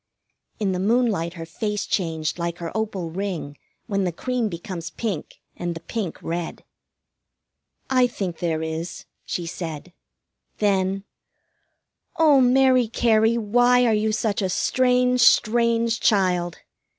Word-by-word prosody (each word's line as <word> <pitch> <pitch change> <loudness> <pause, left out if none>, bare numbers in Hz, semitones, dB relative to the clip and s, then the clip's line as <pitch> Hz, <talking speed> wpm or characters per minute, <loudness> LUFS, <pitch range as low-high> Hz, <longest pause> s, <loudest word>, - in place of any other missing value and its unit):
In 205 -3 0
the 180 - -2
moonlight 205 -5 +1
her 165 -2 -6
face 210 +5 -3
changed 160 -3 -2
like 170 0 -2
her 170 +2 -6
opal 200 -6 -2
ring 175 -6 -4 0.3
when 200 -3 -1
the 180 - 0
cream 245 +5 -2
becomes 170 -1 -6
pink 190 -2 -4 0.2
and 175 -1 -4
the - - -6
pink 195 +1 -4
red. 170 0 -4 1.2
"I 255 -1 +4
think 190 -8 -5
there 160 -2 -1
is," 160 +2 -5 0.2
she 175 - -3
said. 165 0 -6 0.6
Then: 195 -1 +1 1.1
"Oh, 300 -4 +5
Mary 255 -1 +4
Cary, 225 0 +3
why 245 +3 +3
are 230 - +3
you 215 +1 +1
such 215 -1 -1
a 190 - 0
strange, 250 +4 +2
strange 230 0 +3
child?" 180 -4 +1
200 Hz, 130 wpm, -23 LUFS, 170-235 Hz, 1.2 s, Oh